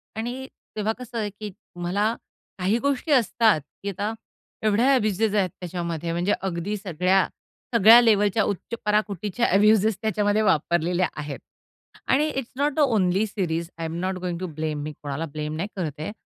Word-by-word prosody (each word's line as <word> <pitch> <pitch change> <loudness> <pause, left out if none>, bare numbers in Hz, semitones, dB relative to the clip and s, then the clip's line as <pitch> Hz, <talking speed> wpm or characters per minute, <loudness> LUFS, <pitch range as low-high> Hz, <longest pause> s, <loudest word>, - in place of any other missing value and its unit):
आणि 245 +4 -4 0.3
तेव्हा 215 +1 0
कसं 250 -1 -7
आहे 210 -2 -1
की 205 0 -8 0.3
मला 205 +6 +1 0.4
काही 195 +5 +2
गोष्टी 280 +3 -1
असतात 225 - +4 0.2
की 200 - -2
आता 205 +3 -3 0.5
एवढ्या 220 +5 +3
अ‍ॅब्यूजेस 215 -3 +1
आहेत 190 -3 +2
त्याच्यामध्ये 170 -2 -4
म्हणजे 175 +4 +1
अगदी 190 +2 -2
सगळ्या 185 0 +1 0.5
सगळ्या 225 +3 +9
लेव्हलच्या 210 -2 +3
उच्च 205 +3 -3
पराकुटीच्या 210 +2 0
अ‍ॅब्यूजेस 210 +1 +4
त्याच्यामध्ये 210 0 +1
वापरलेल्या 175 -1 +2
आहेत 145 -1 -5 0.7
आणि 295 +4 +3
it's 270 -4 -4
not 290 0 +1
the 310 - -3
only 210 -7 +3
series 170 -4 -2
I 165 - -4
am 160 +1 -4
not 185 0 -2
going 175 -2 -3
to 185 - -3
blame. 155 -2 -2
मी 155 - -4
कोणाला 145 +2 -3
ब्लेम 150 0 -4
नाही 175 +6 -2
करते. 155 -1 -4
200 Hz, 160 wpm, -24 LUFS, 175-220 Hz, 0.7 s, सगळ्या